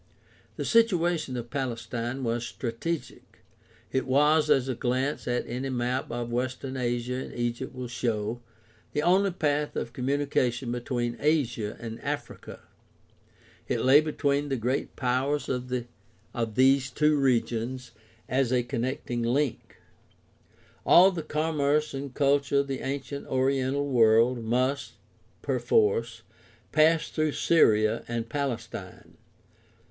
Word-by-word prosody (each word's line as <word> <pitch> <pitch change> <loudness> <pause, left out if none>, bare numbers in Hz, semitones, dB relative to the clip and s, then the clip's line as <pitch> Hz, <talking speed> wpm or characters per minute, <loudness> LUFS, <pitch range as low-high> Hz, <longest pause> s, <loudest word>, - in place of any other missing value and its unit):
The - - -4
situation 175 - +2
of 120 0 -6
Palestine 125 -1 -3
was 115 0 -1
strategic. 125 +8 -5 0.5
It 130 - -1
was, 150 +4 +3
as 135 -1 +3
a 130 - -1
glance 130 +4 -1
at 125 0 0
any 130 +3 -4
map 125 0 -2
of 120 0 -4
Western 130 +2 -3
Asia 120 -1 -1
and - - -11
Egypt 120 +1 -3
will 125 -1 -5
show, 115 -1 -2 0.5
the 150 - 0
only 190 +4 +4
path 150 -4 -1
of 115 - -4
com 125 0 -4
munication 135 -3 0
between 120 -1 -2
Asia 125 -8 0
and 115 -1 -7
Africa. - - -5 1.1
It - - -1
lay 135 +3 +6
between 145 -2 -1
the 135 - 0
great 125 +3 -2
powers 135 +3 0
of 125 -1 -3 0.8
these 130 +1 +4
two 150 +3 +2
regions 125 -1 0 0.4
as 130 -1 +1
a 125 -1 +2
connecting 120 -1 -3
link. 125 +3 -1 1.1
All 185 +3 +7
the 175 -3 -4
commerce 150 -1 0
and 135 0 -5
culture 140 0 +2
of 140 - -6
the 135 -1 -3
ancient 140 +1 -4
oriental 135 +1 0
world 115 -1 +4
must, 130 +5 0 0.5
perforce, 455 0 +1 0.5
pass 160 +1 +4
through 155 -1 0
Syria 110 -8 +3
and 115 -1 -3
Palestine. 140 -2 -5
130 Hz, 125 wpm, -27 LUFS, 120-145 Hz, 1.1 s, All